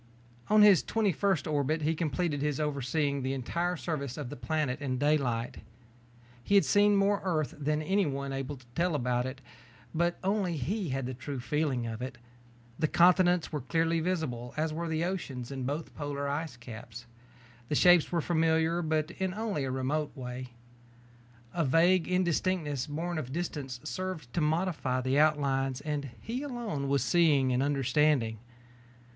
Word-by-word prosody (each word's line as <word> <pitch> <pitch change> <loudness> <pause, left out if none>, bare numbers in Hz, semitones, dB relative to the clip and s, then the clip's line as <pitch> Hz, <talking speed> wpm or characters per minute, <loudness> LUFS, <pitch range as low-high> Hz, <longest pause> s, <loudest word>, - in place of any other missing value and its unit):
On 215 0 +6
his 200 -8 +7
twenty 215 +6 +1
first 190 -4 0
orbit 155 +1 0
he 155 +2 +2
completed 155 -1 -1
his 150 -1 -1
overseeing 140 -1 0
the 130 +1 -1
entire 170 +7 -1
surface 140 -6 -4
of 145 -5 -5
the - - -5
planet 140 +2 -2
in 130 -3 -1
daylight. 130 -5 0 0.9
He 200 - +2
had 200 - +6
seen 205 0 +4
more 200 0 +3
of - - -17
Earth 160 -6 0
than 150 +1 0
anyone 145 -7 0
able 135 +1 -4
to 125 - -18
tell 170 +1 +1
about 125 -2 0
it, 135 +1 -7 0.5
but 170 +1 +1
only 190 -4 0
he 185 - -2
had 135 0 -2
the 130 - -4
true 130 +2 -5
feeling 135 -1 -1
of 115 0 -5
it. 130 0 -5 0.6
The 155 - +2
continents 180 +1 +4
were 150 -3 -2
clearly 165 +5 +1
visible, 155 -9 -2
as 155 0 0
were 170 +2 -3
the 160 +1 0
oceans 140 -9 -4
and 130 -2 -3
both 150 +3 -4
polar 145 -1 -3
ice 145 -2 -3
caps. 115 0 -10 0.6
The 150 - 0
shapes 175 +1 +5
were 170 -2 +1
familiar 160 +1 +2
but 155 0 0
in 185 +1 -3
only 210 -10 -2
a - - -2
remote 140 +4 -2
way. 125 0 -6 1.1
A 170 - +1
vague 165 +4 +4
indistinctness 175 -5 0
borne 165 +3 -3
of 130 -4 -6
distance 145 -6 -4
served 160 -4 -5
to 170 - 0
modify 155 -5 0
the 130 +3 +1
outlines 135 -4 +2
and 145 -1 -3
he 240 +4 -4
alone 235 - -3
was 140 -3 +2
seeing 140 -1 +3
and 125 - +1
understanding. 135 -4 +2
150 Hz, 165 wpm, -30 LUFS, 135-170 Hz, 1.1 s, his